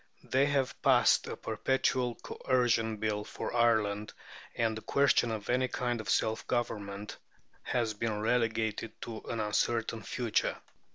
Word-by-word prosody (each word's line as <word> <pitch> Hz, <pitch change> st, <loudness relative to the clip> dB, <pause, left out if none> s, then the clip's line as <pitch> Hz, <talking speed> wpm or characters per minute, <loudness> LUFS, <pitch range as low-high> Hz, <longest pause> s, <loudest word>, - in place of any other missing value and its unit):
They 135 Hz, +2 st, +2 dB
have 140 Hz, -3 st, 0 dB
passed -, -, +4 dB
a -, -, -5 dB
perpetual 130 Hz, -2 st, 0 dB
Coercion 115 Hz, -4 st, 0 dB
Bill 105 Hz, -1 st, -1 dB
for 110 Hz, -, -5 dB
Ireland, 105 Hz, -3 st, +2 dB, 0.4 s
and 115 Hz, -1 st, +1 dB
the 110 Hz, -, -6 dB
question 140 Hz, -2 st, +3 dB
of 110 Hz, -2 st, -4 dB
any 130 Hz, +1 st, +2 dB
kind 120 Hz, -2 st, -2 dB
of 110 Hz, -, -8 dB
self 110 Hz, 0 st, +1 dB
government 105 Hz, -4 st, -3 dB, 0.4 s
has 115 Hz, -3 st, -1 dB
been 105 Hz, 0 st, -2 dB
relegated 110 Hz, -1 st, 0 dB
to 110 Hz, -2 st, -6 dB
an 115 Hz, -, -2 dB
uncertain 110 Hz, +1 st, 0 dB
future. 115 Hz, +2 st, -1 dB
115 Hz, 135 wpm, -31 LUFS, 110-125 Hz, 0.4 s, passed